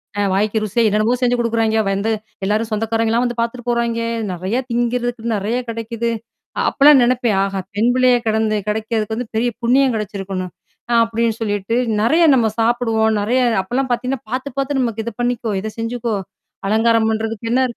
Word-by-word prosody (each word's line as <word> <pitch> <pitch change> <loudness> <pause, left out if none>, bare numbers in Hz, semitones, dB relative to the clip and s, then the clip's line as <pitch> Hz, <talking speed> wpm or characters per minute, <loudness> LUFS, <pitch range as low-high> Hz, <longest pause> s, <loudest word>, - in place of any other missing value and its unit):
ஆ 205 - 0
வாய்க்கு 210 +3 +1
ருசியா 215 +3 +1
என்னென்னமோ! 215 +3 +2
செஞ்சு 245 -1 +3
கொடுக்குறாங்கே. 225 -1 +1
வந்து 200 +3 0 0.3
எல்லாரும் 215 +3 0
சொந்தக்காரங்க 225 +1 0
எல்லாம் 235 +2 +2
வந்து 240 -1 -3
பாத்துட்டு 235 +1 -3
போறாங்கே. 235 -1 0 0.2
நிறைய 185 +6 -2
திங்கறதுக்கு 240 -1 -1
நிறைய 210 +5 -1
கிடைக்குது. 230 0 -3 0.5
அ - - 0
அப்பெல்லாம் 285 -1 +6
நினைப்பேன். 240 -3 +2
ஆஹா! 195 0 -2 0.2
பெண்பிள்ளையா 245 +3 +3
கிடந்து 220 0 +1
கிடைக்குறதுக்கு 220 0 -1
வந்து 245 +1 -4
பெரிய 235 +2 +2
புண்ணியம் 255 +2 +3
கிடைச்சிருக்கணும். 195 -3 -4 0.4
நான் 235 -1 +4
அப்பிடின்னு 230 0 -1
சொல்லிட்டு 205 0 -1 0.3
நிறைய 310 +10 +3
நம்ம 240 -4 +3
சாப்பிடுவோம், 225 -1 +2
நிறைய 235 +5 +1 0.2
அப்பல்லாம் 255 +8 -2
பாத்தீங்கன்னா 250 +2 -1
பாத்து, 255 +3 -3
பாத்து 275 +1 -1
நமக்கு 230 -3 -1
இது 235 - -3
பண்ணிக்கோ! 240 -1 -1
இதைச் 215 +2 -7
செஞ்சுக்கோ! 230 -1 -2 0.5
அலங்காரம் 225 +1 +3
பண்றதுக்குன்னு 225 0 -2
என்ன? 260 +1 +3
230 Hz, 160 wpm, -19 LUFS, 220-240 Hz, 0.5 s, அப்பெல்லாம்